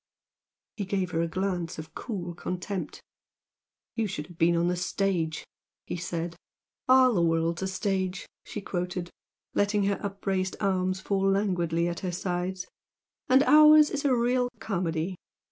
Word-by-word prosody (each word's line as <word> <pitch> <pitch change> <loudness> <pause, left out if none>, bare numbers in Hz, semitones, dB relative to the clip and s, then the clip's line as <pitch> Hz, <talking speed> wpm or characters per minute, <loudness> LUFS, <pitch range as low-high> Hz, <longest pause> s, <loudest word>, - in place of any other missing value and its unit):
He 205 - -2
gave 185 -2 -1
her 165 - 0
a 170 - 0
glance 180 -1 -2
of 160 0 -8
cool 180 -7 -5
contempt. 180 0 -5 0.9
"You 225 -2 -1
should 150 -6 -5
have 175 0 -15
been 170 +1 +4
on 170 +1 +2
the 180 - +1
stage!" 180 -3 -1 0.4
he - - -4
said. 170 -1 -4 0.5
"'All 255 -1 +6
the 180 - +2
world's 165 +1 +1
a 190 - -1
stage,'" 190 -1 -2 0.2
she 210 - -6
quoted, 180 -2 -3 0.4
letting 205 0 +2
her 200 0 0
upraised 195 -2 -2
arms 185 -1 0
fall 195 0 +1
languidly 175 -4 +1
at 170 0 -3
her 185 - -3
sides 180 +1 -3 0.6
"And 260 +2 +6
ours 305 0 +7
is 290 - -2
a 275 -3 +3
real 245 +1 +1
comedy! 180 -4 -2
185 Hz, 150 wpm, -28 LUFS, 175-200 Hz, 0.9 s, ours